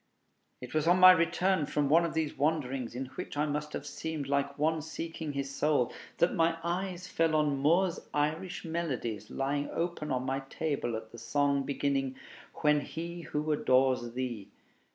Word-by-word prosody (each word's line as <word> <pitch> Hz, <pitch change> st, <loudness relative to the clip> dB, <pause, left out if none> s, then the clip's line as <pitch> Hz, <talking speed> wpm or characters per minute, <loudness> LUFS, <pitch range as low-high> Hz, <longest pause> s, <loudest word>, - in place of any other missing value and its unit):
It 125 Hz, -, -8 dB
was 155 Hz, +1 st, +1 dB
on 180 Hz, +2 st, +5 dB
my 185 Hz, 0 st, +11 dB
return 170 Hz, -1 st, +2 dB
from 145 Hz, -1 st, +1 dB
one 165 Hz, +4 st, +5 dB
of 160 Hz, -2 st, -4 dB
these 160 Hz, -2 st, -1 dB
wanderings, 135 Hz, -5 st, -1 dB
in 130 Hz, +2 st, -3 dB
which -, -, -6 dB
I 150 Hz, -, +2 dB
must 150 Hz, 0 st, -3 dB
have -, -, -4 dB
seemed 160 Hz, -3 st, -4 dB
like 140 Hz, 0 st, 0 dB
one 155 Hz, +2 st, +1 dB
seeking 160 Hz, 0 st, -5 dB
his 140 Hz, 0 st, -3 dB
soul, 145 Hz, -4 st, +1 dB, 0.2 s
that 170 Hz, -, +3 dB
my 165 Hz, 0 st, +2 dB
eyes 180 Hz, +1 st, -2 dB
fell 165 Hz, -2 st, +1 dB
on 150 Hz, -3 st, +2 dB
Moore's 170 Hz, +5 st, +3 dB
'Irish 155 Hz, +6 st, -1 dB
Melodies,' 130 Hz, -11 st, -3 dB
lying 140 Hz, +2 st, -1 dB
open 170 Hz, -2 st, -2 dB
on 130 Hz, -1 st, 0 dB
my 135 Hz, +1 st, -1 dB
table 140 Hz, -7 st, -2 dB
at 110 Hz, 0 st, -7 dB
the 120 Hz, -, -10 dB
song 145 Hz, +1 st, +1 dB
beginning 135 Hz, -1 st, -1 dB, 0.5 s
"When 150 Hz, -1 st, +4 dB
he 170 Hz, +4 st, -6 dB
who 155 Hz, -1 st, -2 dB
adores 130 Hz, -4 st, +2 dB
thee." 120 Hz, -5 st, -4 dB
150 Hz, 175 wpm, -31 LUFS, 135-165 Hz, 0.5 s, my